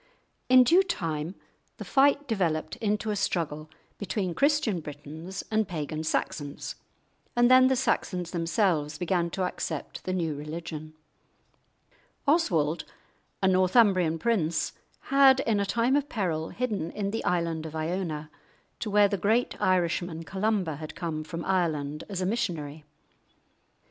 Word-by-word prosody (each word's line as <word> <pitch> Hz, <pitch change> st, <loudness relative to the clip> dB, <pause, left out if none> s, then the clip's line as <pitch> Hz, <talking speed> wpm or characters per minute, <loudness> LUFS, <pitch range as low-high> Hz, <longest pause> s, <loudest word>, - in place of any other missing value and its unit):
In 255 Hz, 0 st, +8 dB
due 340 Hz, +9 st, +5 dB
time 165 Hz, -, -3 dB, 0.4 s
the -, -, -7 dB
fight 285 Hz, +1 st, +3 dB
developed 175 Hz, -9 st, -1 dB
into 210 Hz, 0 st, -1 dB
a -, -, -1 dB
struggle 155 Hz, -5 st, -2 dB, 0.3 s
between 195 Hz, -3 st, -2 dB
Christian 280 Hz, -, +2 dB
Britons 155 Hz, +5 st, -8 dB
and 220 Hz, -2 st, +2 dB
pagan 155 Hz, -3 st, -4 dB
Saxons, 145 Hz, -2 st, -2 dB, 0.6 s
and 240 Hz, +1 st, +4 dB
then 255 Hz, 0 st, +8 dB
the 265 Hz, -, +3 dB
Saxons 180 Hz, -8 st, -1 dB
themselves 165 Hz, -4 st, 0 dB
began 175 Hz, 0 st, 0 dB
to 185 Hz, +2 st, -2 dB
accept 165 Hz, -4 st, -4 dB
the 185 Hz, -, -1 dB
new 170 Hz, -4 st, -1 dB
religion. 155 Hz, +1 st, -7 dB, 1.3 s
Oswald, 175 Hz, -, +2 dB, 0.6 s
a -, -, +5 dB
Northumbrian 185 Hz, -3 st, +4 dB
prince, 165 Hz, -6 st, 0 dB, 0.4 s
had 270 Hz, -1 st, +7 dB
in 220 Hz, -5 st, +1 dB
a 200 Hz, -, 0 dB
time 235 Hz, +6 st, +2 dB
of 290 Hz, 0 st, 0 dB
peril 165 Hz, -7 st, -2 dB
hidden 215 Hz, -9 st, -2 dB
in 200 Hz, +1 st, -3 dB
the 225 Hz, -, -3 dB
island 165 Hz, -2 st, -1 dB
of 160 Hz, -, -9 dB
Iona, 160 Hz, -2 st, -3 dB, 0.5 s
to 220 Hz, -, -3 dB
where 205 Hz, 0 st, +5 dB
the 200 Hz, -, -1 dB
great 220 Hz, +6 st, +1 dB
Irishman 175 Hz, -2 st, +1 dB
Columba 190 Hz, -4 st, -1 dB
had 155 Hz, 0 st, -8 dB
come 160 Hz, -3 st, -3 dB
from 165 Hz, +2 st, -6 dB
Ireland 155 Hz, -5 st, -1 dB
as 190 Hz, -2 st, -3 dB
a -, -, 0 dB
missionary. 160 Hz, -8 st, -2 dB
180 Hz, 140 wpm, -28 LUFS, 160-215 Hz, 1.3 s, In